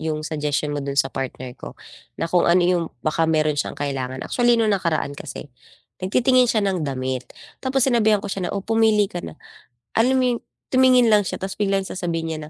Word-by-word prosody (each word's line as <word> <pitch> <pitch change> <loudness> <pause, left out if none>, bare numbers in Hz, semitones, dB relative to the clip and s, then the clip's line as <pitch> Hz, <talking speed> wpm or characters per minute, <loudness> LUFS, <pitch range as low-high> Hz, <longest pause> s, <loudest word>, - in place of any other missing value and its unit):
'yong 155 -1 -2
suggestion 150 -1 -2
mo 145 - -2
do'n 140 0 -4
sa 135 -1 +2
partner 130 -1 -5
ko - - -11 0.4
na - - -2
kung 170 +1 +2
ano 175 +1 +5
'yong 175 -1 +2 0.2
baka 160 +1 +1
meron 155 -1 +2
s'yang 145 - -3
kailangan 130 -2 -3
actually 240 -1 +2
no'ng 220 -2 +2
nakaraan 165 -6 -1
kasi 140 -1 -9 0.5
nagtitingin 250 +6 +3
siya 215 -3 +1
ng 190 -3 0
damit 130 -3 -3 0.3
tapos 265 -1 +1
sinabihan 220 -5 +2
ko 200 - -3
siya 180 -3 -3
na, - - -4
"oh, 195 - -4
pumili 220 -1 +3
ka 175 - -4
na," 160 - -9 0.6
alam 250 +4 +3
mo - - +2
'yong, - - -9 0.3
tumingin 255 -2 +5
lang 210 - +6
siya - - -3
tapos 190 0 -5
biglang 195 -1 +1
sasabihin 170 -4 -3
niya 155 - -4
180 Hz, 200 wpm, -22 LUFS, 150-220 Hz, 0.6 s, lang